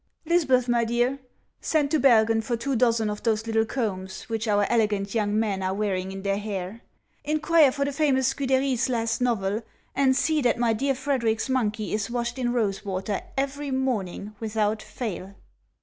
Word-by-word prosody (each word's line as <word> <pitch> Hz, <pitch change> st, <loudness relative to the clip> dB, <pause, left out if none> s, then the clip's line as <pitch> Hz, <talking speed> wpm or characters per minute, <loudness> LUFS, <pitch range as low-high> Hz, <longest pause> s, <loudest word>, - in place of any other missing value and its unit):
" -, -, -47 dB
Lisbeth, 290 Hz, -7 st, +3 dB
my 240 Hz, -1 st, +2 dB
dear, 240 Hz, +4 st, 0 dB, 0.4 s
send 295 Hz, -3 st, 0 dB
to 315 Hz, -, +3 dB
Bergen 225 Hz, -4 st, +4 dB
for 235 Hz, +1 st, -2 dB
two 270 Hz, +3 st, -2 dB
dozen 230 Hz, -2 st, +2 dB
of 210 Hz, 0 st, -4 dB
those 220 Hz, -1 st, 0 dB
little 225 Hz, 0 st, +1 dB
combs 190 Hz, -7 st, -3 dB
which 225 Hz, -1 st, -3 dB
our 205 Hz, -1 st, +3 dB
elegant 210 Hz, -4 st, 0 dB
young 210 Hz, -2 st, 0 dB
men 205 Hz, -4 st, -1 dB
are 190 Hz, 0 st, -1 dB
wear 205 Hz, -1 st, 0 dB
ing 185 Hz, +1 st, -3 dB
in 195 Hz, 0 st, -7 dB
their 200 Hz, 0 st, 0 dB
hair, 205 Hz, +1 st, -5 dB, 0.4 s
inquire 310 Hz, -1 st, +4 dB
for 280 Hz, +1 st, -1 dB
the 285 Hz, -, -1 dB
famous 270 Hz, -3 st, +2 dB
Seude'ry's 260 Hz, -2 st, +1 dB
last 230 Hz, -1 st, -1 dB
novel, 215 Hz, -3 st, 0 dB, 0.3 s
and 265 Hz, -1 st, +3 dB
see 310 Hz, +2 st, +1 dB
that 245 Hz, -3 st, +2 dB
my 235 Hz, -1 st, +2 dB
dear 270 Hz, +5 st, 0 dB
Frederic's 250 Hz, -4 st, -1 dB
monkey 220 Hz, -5 st, -1 dB
is 210 Hz, 0 st, -1 dB
washed 240 Hz, +1 st, -3 dB
in 240 Hz, -1 st, 0 dB
rose 215 Hz, -5 st, -1 dB
water 195 Hz, +1 st, -3 dB, 0.2 s
every 280 Hz, +1 st, -2 dB
morning, 220 Hz, -7 st, -2 dB
without 215 Hz, -1 st, -1 dB
fail." 200 Hz, -5 st, -6 dB
230 Hz, 180 wpm, -25 LUFS, 210-265 Hz, 0.4 s, Bergen